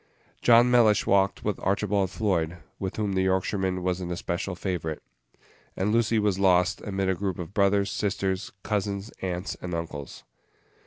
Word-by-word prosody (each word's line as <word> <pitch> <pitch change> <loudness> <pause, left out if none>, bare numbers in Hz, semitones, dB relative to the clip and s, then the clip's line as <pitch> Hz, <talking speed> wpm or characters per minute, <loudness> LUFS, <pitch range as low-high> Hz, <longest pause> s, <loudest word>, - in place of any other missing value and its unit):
John 120 +1 +6
Mellish 110 -4 +5
walked 100 0 +2
with 105 -2 -1
Archibald 100 -1 +1
Floyd, 85 -5 -1 0.2
with 95 -1 -3
whom 105 -2 -1
the 95 - +1
Yorkshireman 95 0 0
was 90 0 -1
an 90 - -4
especial 90 +2 -3
favorite; 85 -4 -3 0.7
and 100 +3 +1
Lucy 115 0 +2
was 105 -3 +1
lost 90 -2 +3
amid 95 -1 -2
a 95 - +3
group 95 -1 -3
of 90 +1 -7
brothers, 100 -1 +2
sisters, 100 +1 -2
cousins, 100 0 -2
aunts, 90 0 -3
and 90 -1 -4
uncles. 80 -4 -6
95 Hz, 155 wpm, -26 LUFS, 90-105 Hz, 0.7 s, John